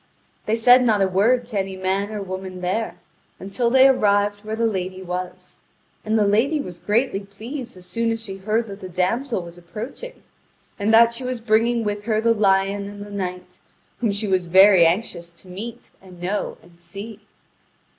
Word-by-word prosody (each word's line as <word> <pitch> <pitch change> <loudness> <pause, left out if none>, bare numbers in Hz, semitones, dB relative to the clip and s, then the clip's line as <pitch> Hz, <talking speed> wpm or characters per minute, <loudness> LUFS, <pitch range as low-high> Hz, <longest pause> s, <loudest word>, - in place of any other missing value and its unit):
They 215 - +2
said 245 +2 +6
not 215 -5 +3
a - - +3
word 225 +7 +2
to 220 -4 -3
any 190 0 -4
man 190 +2 -1
or 210 -2 -5
woman 185 -1 -6
there, 190 +5 -2 0.4
until 215 +5 -1
they 265 +2 +6
arrived 205 -4 +2
where 215 +1 -4
the 230 +1 0
lady 190 -3 -3
was. 180 0 -6 0.5
And 220 +1 0
the 210 - +3
lady 235 +10 +2
was 180 -10 -7
greatly 210 +4 0
pleased 225 +4 -8
as 180 - -13
soon 230 +4 -1
as 225 - -2
she 200 -4 -8
heard 215 +4 0
that 200 -2 -10
the 185 - -7
damsel 185 +5 -1
was 170 0 -11
approaching, 230 - -9 0.6
and 205 +2 +1
that 230 +1 +6
she 245 +3 -7
was 250 -1 -3
bringing 230 +1 +2
with 205 -1 -3
her 220 -2 +1
the 230 +1 +3
lion 200 -1 +1
and 205 0 -8
the 205 - -12
knight, 180 -2 -6 0.4
whom 230 -4 +1
she 205 +2 -3
was 185 -2 0
very 190 -1 +7
anxious 170 -1 -2
to - - -19
meet 225 +6 -8
and 185 -2 -15
know 185 +4 -3
and 170 0 -21
see. 200 +5 -9
205 Hz, 190 wpm, -22 LUFS, 185-230 Hz, 0.6 s, very